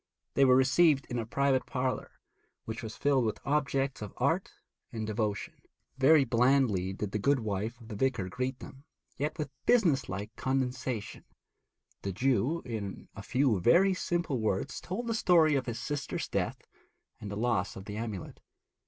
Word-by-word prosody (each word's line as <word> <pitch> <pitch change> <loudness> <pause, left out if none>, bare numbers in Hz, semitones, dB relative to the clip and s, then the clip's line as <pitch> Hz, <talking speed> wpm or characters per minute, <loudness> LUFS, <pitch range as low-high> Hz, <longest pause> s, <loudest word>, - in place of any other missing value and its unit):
They 140 - +5
were 130 -1 +6
received 135 +2 +4
in 120 - -1
a 115 - -4
private 135 +1 +1
parlour, 130 0 -3 0.5
which 110 +1 -5
was 110 -2 -7
filled 140 -3 +2
with 110 -2 -1
objects 135 -3 0
of 105 -2 -7
art - - +1 0.4
and 110 -1 -4
devotion. 105 -1 -3 0.3
Very 140 +2 +6
blandly 120 -6 +2
did 100 +1 -4
the 105 - -1
good 140 +3 +2
wife 110 +3 -3
of 115 - -14
the 110 - -6
vicar 125 -4 0
greet 125 +4 -3
them, 135 +1 -12 0.4
yet 150 +3 -2
with 150 -3 -4 0.2
business 170 - +3
like 100 +4 -5
condescension. 125 -4 -2 0.8
The 100 - -3
Jew, 135 - +1
in 105 -5 -5
a 100 - -7
few 125 -2 +1
very 175 - +5
simple 175 -7 -1
words, 110 +4 -1
told 200 +7 -4
the 230 - -1
story 170 -7 +4
of 135 -2 0
his 120 -1 -3
sister's 145 +3 -3
death - - -2 0.6
and 105 - -7
the 100 - -5
loss 115 -4 0
of 95 - -9
the 105 0 -6
amulet. 110 -5 -5
125 Hz, 170 wpm, -30 LUFS, 110-140 Hz, 0.8 s, were